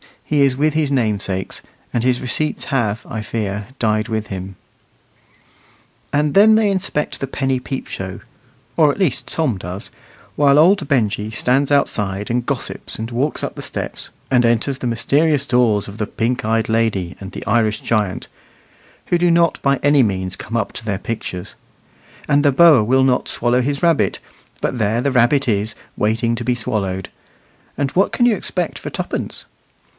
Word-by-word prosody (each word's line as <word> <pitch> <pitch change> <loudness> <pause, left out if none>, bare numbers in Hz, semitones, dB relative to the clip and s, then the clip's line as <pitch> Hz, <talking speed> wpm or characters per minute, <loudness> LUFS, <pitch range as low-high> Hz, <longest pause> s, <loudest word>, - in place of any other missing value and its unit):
he 150 -1 +1
is 135 -2 +3
with 150 +1 +2
his 155 -2 +1
namesakes, 105 -7 -1 0.3
and 120 - 0
his 125 -1 +1
receipts 150 +4 -1
have, 115 -5 -1
I 110 -5 -4
fear, 105 -2 -3
died 110 -1 +1
with 110 -2 -3
him. 95 0 -6 1.6
And 150 0 +1
then 215 +2 +7
they 215 -2 +3
inspect 185 -6 -1
the 135 - -3
penny 135 -1 -1
peep 130 +1 -5
show 95 -1 -6 0.6
at 150 -3 +4
least 185 -9 0
Tom 145 -10 0
does 90 +3 -6 0.4
while 145 -1 +4
old 170 +1 +4
Benjy 110 -5 0
stands 130 +5 +1
outside 105 -7 0
and 120 0 0
gossips - - -4
and 115 +2 -5
walks 130 +6 -1
up - - -3
the - - -8
steps, - - -4 0.2
and 125 -2 +4
enters 120 +3 +1
the 125 - -3
mysterious 140 +5 +1
doors 120 -6 +2
of 105 +2 -10
the 105 - -1
pink 125 +4 -2
eyed 115 0 0
lady 110 -6 0
and 95 0 -9
the - - -7
Irish 110 -1 +1
giant, 105 -5 -1 0.8
who 175 - +2
do 175 0 +3
not 170 -1 +3
by 140 0 +2
any 145 0 +5
means 95 -5 -1
come 115 +2 -4
up 110 -3 -1
to 115 - -8
their 100 -3 -1
pictures; 95 -4 -5 0.7
and 145 +1 +3
the 145 -2 +4
boa 155 -6 +7
will 130 +4 +3
not 130 -1 +2
swallow 120 +1 +2
his 140 +4 -2
rabbit, 150 - +2 0.4
but 125 - -2
there 110 +2 +1
the 140 - 0
rabbit 130 +2 +3
is 105 0 0 0.2
waiting 115 +2 0
to 120 0 -5
be 125 0 +1
swallowed; 95 -6 -2 0.7
and 140 -2 -1
what 195 - +2
can 240 - +2
you 240 -3 +4
expect 180 -3 -3
for - - -6
tuppence? - - -4
120 Hz, 175 wpm, -19 LUFS, 105-140 Hz, 1.6 s, then